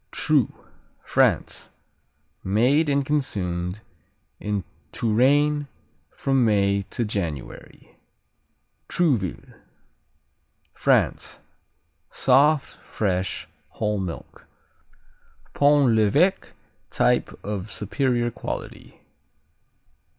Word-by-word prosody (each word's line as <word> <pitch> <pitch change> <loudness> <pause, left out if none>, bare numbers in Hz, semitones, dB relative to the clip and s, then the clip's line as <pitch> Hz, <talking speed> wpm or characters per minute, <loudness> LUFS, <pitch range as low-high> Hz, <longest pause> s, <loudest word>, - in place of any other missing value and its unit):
Troo - - +1 0.5
France - - +1 0.7
Made 125 +11 +2
and 140 -1 +1
consumed 95 -10 -2 0.6
in 105 -2 -2 0.3
Touraine 145 +6 +2 0.4
from 135 -2 0
May 100 -2 +2
to 120 - -2
January. 85 -10 -6 0.9
Trouville 125 - -1 1.2
France - - +1 0.7
Soft, 140 +2 +3
fresh, 95 -3 -3 0.2
whole 105 -1 -2
milk. 90 -3 -7 1.1
Pont 145 -4 +4
l'Evêque 145 - +2 0.4
type - - +1
of 105 0 -5
superior 120 +2 -1
quality. - - -7
115 Hz, 70 wpm, -24 LUFS, 100-140 Hz, 1.2 s, Pont